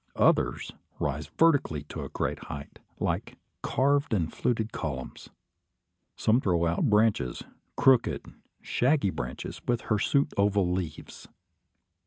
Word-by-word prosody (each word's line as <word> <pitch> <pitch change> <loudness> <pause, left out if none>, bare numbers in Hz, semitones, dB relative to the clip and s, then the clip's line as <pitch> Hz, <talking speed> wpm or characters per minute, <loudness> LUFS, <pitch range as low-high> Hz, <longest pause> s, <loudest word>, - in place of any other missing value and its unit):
Others - - +2 0.3
rise 75 +2 -2
vertically 145 - +3
to 75 - -7
a - - -6
great - - -3
height, 70 -1 -8 0.2
like - - -2 0.2
carved 140 -2 +1
and 85 -5 -1
fluted 110 -2 -1
columns. 65 -4 -5 0.9
Some 115 +4 +2
throw 85 -6 +1
out 85 +1 +1
branches, 105 - +2 0.3
crooked, 130 -3 +3 0.4
shaggy 130 -5 +2
branches, 60 -4 -6
with 120 -2 +1
hirsute 140 +7 +1
oval 100 -2 +2
leaves. 90 -4 -5
100 Hz, 115 wpm, -28 LUFS, 80-125 Hz, 0.9 s, vertically